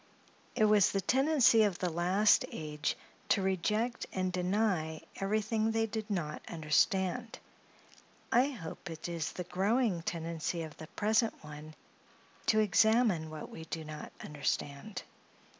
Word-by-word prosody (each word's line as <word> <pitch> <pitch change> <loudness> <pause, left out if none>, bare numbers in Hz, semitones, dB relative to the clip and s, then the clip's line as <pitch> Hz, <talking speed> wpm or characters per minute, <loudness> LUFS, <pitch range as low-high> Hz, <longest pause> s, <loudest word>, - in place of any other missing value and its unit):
It 215 - +4
was 210 -2 +5
the 195 - 0
tendency 260 - +4
of 205 -4 +2
the 180 -2 -1
last 180 +5 +4
age 150 -1 -3 0.3
to 195 - +3
reject 210 +6 0
and 185 -1 -1
deny 180 -4 0 0.2
everything 215 +2 0
they 225 0 +1
did 220 0 -5
not 170 -7 -2
understand; 190 +8 +1 0.9
I 250 +3 +5
hope 175 - -7
it 165 0 -6
is 170 -2 -3
the 180 - -4
growing 195 +2 +1
tendency 165 0 -3
of 155 -2 -8
the 155 - -9
present 220 +5 +1
one 150 +1 -10 0.7
to 215 - +4
examine 215 -4 +3
what 155 -1 -8
we 160 - -8
do 160 0 -5
not 155 -1 -8
understand. 145 +5 -3
185 Hz, 135 wpm, -32 LUFS, 160-220 Hz, 0.9 s, was